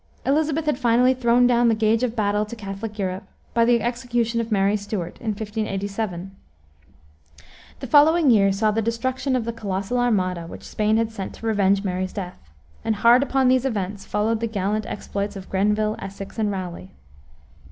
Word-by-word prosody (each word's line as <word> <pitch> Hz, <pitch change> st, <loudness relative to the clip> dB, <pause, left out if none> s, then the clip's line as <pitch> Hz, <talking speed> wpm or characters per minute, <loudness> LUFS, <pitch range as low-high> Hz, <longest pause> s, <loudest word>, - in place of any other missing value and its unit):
Elisabeth 305 Hz, +2 st, +1 dB
had 300 Hz, -4 st, 0 dB
finally 250 Hz, +1 st, +4 dB
thrown 245 Hz, -1 st, +3 dB
down 240 Hz, -1 st, +4 dB
the 225 Hz, -, +3 dB
gage 220 Hz, +1 st, +2 dB
of 245 Hz, -2 st, -1 dB
battle 205 Hz, -1 st, +1 dB
to 215 Hz, +2 st, -7 dB
Catholic 210 Hz, 0 st, -6 dB
Europe, 190 Hz, 0 st, -3 dB, 0.3 s
by 230 Hz, 0 st, +3 dB
the 235 Hz, -1 st, +3 dB
execution 240 Hz, -1 st, -1 dB
of 230 Hz, 0 st, -6 dB
Mary 200 Hz, 0 st, +2 dB
Stuart, 205 Hz, -4 st, -5 dB
in 230 Hz, -, -8 dB
1587. 205 Hz, -3 st, -3 dB, 1.5 s
The -, -, -4 dB
following 300 Hz, +3 st, +5 dB
year 200 Hz, -3 st, +4 dB
saw 210 Hz, +2 st, +1 dB
the 225 Hz, +2 st, 0 dB
destruction 260 Hz, +4 st, -1 dB
of 245 Hz, -3 st, -1 dB
the 230 Hz, -, -3 dB
colossal 200 Hz, +2 st, -2 dB
Armada, 185 Hz, -8 st, 0 dB
which -, -, -10 dB
Spain 215 Hz, +1 st, 0 dB
had 225 Hz, 0 st, 0 dB
sent 195 Hz, -4 st, -6 dB
to -, -, -10 dB
revenge 200 Hz, -2 st, +2 dB
Mary's 185 Hz, -1 st, -2 dB
death, 180 Hz, -, -7 dB, 0.3 s
and 220 Hz, -1 st, 0 dB
hard 235 Hz, +4 st, +5 dB
upon 270 Hz, -2 st, +2 dB
these 255 Hz, 0 st, +3 dB
events 205 Hz, -6 st, -3 dB
followed 215 Hz, +3 st, 0 dB
the 230 Hz, -, -1 dB
gallant 210 Hz, 0 st, -2 dB
exploits 200 Hz, 0 st, -4 dB
of 195 Hz, -1 st, -9 dB
Grenville, 210 Hz, +2 st, +1 dB
Essex, 195 Hz, +2 st, -8 dB
and 215 Hz, -1 st, +1 dB
Raleigh. 180 Hz, -, -5 dB
215 Hz, 175 wpm, -23 LUFS, 195-235 Hz, 1.5 s, following